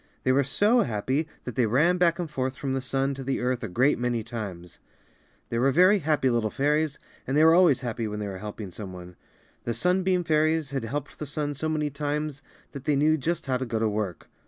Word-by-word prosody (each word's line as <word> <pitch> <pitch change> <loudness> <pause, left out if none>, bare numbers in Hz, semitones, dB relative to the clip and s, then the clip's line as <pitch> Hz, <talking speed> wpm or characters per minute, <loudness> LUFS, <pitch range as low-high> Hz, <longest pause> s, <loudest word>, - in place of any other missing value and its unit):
They 130 - +3
were 140 +2 +3
so 205 - +3
happy 130 +7 -1 0.2
that 125 - -5
they 120 0 +2
ran 160 +11 +3
back 170 -1 +3
and 175 -2 -3
forth 130 -3 -3
from 135 -2 -2
the 135 - -1
sun 135 +1 -1
to 135 0 -7
the 135 +1 -1
earth 125 0 -1
a - - -2
great 125 +9 +2
many 120 -2 -1
times. 100 -7 -7 0.7
They 115 - -1
were 135 +3 +4
very 185 +7 +5
helpful 150 -5 +1
little 115 -2 +1
fairies 150 +4 0 0.3
and 135 - 0
they 155 - +6
were 160 0 +7
always 170 -6 +5
happy 115 -2 -3
when 105 0 -4
they 105 -1 -3
were 95 -1 -6
help 105 +2 -7
ing 100 -4 -6
some 95 0 -8
one. 90 0 -10 0.5
The 115 - -2
sunbeam 180 - +1
fairies 155 -2 +1
had 135 -4 -2
helped 145 +5 -5
the 150 - -5
sun 145 +1 -2
so 155 +3 -3
many 150 -2 -1
times 145 0 -3 0.3
that 140 -1 -9
they 150 - +2
knew 155 +3 +3
just 160 +3 -2
how 130 -2 0
to 130 - -3
go 115 -1 -2
to 110 0 +1
work. 105 -5 -3
135 Hz, 235 wpm, -26 LUFS, 115-155 Hz, 0.7 s, were